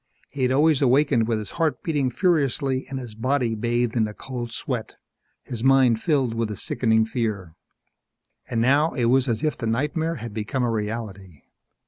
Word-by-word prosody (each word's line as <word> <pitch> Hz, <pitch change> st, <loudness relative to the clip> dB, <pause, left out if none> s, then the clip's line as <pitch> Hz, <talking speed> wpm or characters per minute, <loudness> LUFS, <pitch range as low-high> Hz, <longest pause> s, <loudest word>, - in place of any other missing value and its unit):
He 140 Hz, -, -6 dB
had 130 Hz, 0 st, +2 dB
always 150 Hz, +1 st, +3 dB
awakened 130 Hz, -3 st, +3 dB
with 115 Hz, -2 st, +1 dB
his 105 Hz, -1 st, -6 dB
heart 165 Hz, -3 st, -1 dB
beating 145 Hz, -5 st, 0 dB
furiously 140 Hz, -4 st, 0 dB
and 135 Hz, -, -4 dB
his 120 Hz, -4 st, -7 dB
body 125 Hz, +1 st, 0 dB
bathed 120 Hz, +1 st, -1 dB
in 110 Hz, -2 st, +2 dB
a 105 Hz, -, -9 dB
cold 120 Hz, -3 st, -6 dB
sweat, 115 Hz, -2 st, -4 dB, 0.5 s
his 120 Hz, -2 st, -6 dB
mind 130 Hz, -4 st, +4 dB
filled 135 Hz, -8 st, +1 dB
with 115 Hz, -1 st, -1 dB
a 105 Hz, -, -5 dB
sickening 110 Hz, 0 st, +1 dB
fear. 110 Hz, -7 st, -3 dB, 1.0 s
And 115 Hz, -, 0 dB
now 140 Hz, +6 st, +3 dB
it 120 Hz, -, +1 dB
was 130 Hz, +2 st, +3 dB
as 115 Hz, +5 st, -1 dB
if 155 Hz, -, +1 dB
the 115 Hz, -, -4 dB
nightmare 150 Hz, +8 st, -1 dB
had 115 Hz, -6 st, -7 dB
become 110 Hz, +4 st, -2 dB
a 120 Hz, -, +1 dB
reality. 105 Hz, -7 st, -5 dB
120 Hz, 180 wpm, -24 LUFS, 110-135 Hz, 1.0 s, mind